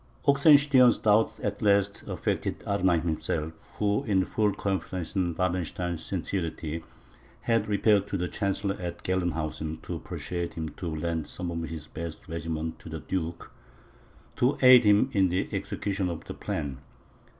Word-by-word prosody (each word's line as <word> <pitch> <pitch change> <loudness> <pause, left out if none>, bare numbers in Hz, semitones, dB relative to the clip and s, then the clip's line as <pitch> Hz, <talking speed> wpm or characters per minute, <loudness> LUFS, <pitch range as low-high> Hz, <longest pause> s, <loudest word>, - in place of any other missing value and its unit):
Oxenstiern's 140 -3 +6
doubts 110 +1 +3
at 105 0 -2
last 100 -1 +2
affected - - -2
Arnheim 95 -4 +2
himself, 80 -1 -2 0.2
who, 105 +5 +1
in 95 -5 +2
full 105 -2 +1
confidence 95 -3 -3
in 90 -3 0
Wallenstein's 90 -1 -2
sincerity, 80 -4 -3 0.6
had 115 -2 +1
repaired 105 -1 +3
to 100 - -2
the 90 0 -1
chancellor 100 +1 -1
at 85 -1 -5
Gelnhausen, 80 -3 -2
to - - -4
persuade 85 -1 -4
him 80 -1 -3
to 90 +3 -7
lend 80 0 -2
some 90 -1 -5
of 85 -1 -4
his 80 -2 -7
best 80 +1 -7
regiments 80 -1 -4
to - - -10
the - - -5
duke, 85 -2 -4 0.9
to 125 +3 +2
aid 125 -2 +9
him 105 +6 +5
in 95 -3 +3
the 90 +2 0
execution 95 -2 -2
of 85 -2 -5
the - - -6
plan. 70 -4 -4
90 Hz, 150 wpm, -28 LUFS, 80-105 Hz, 0.9 s, aid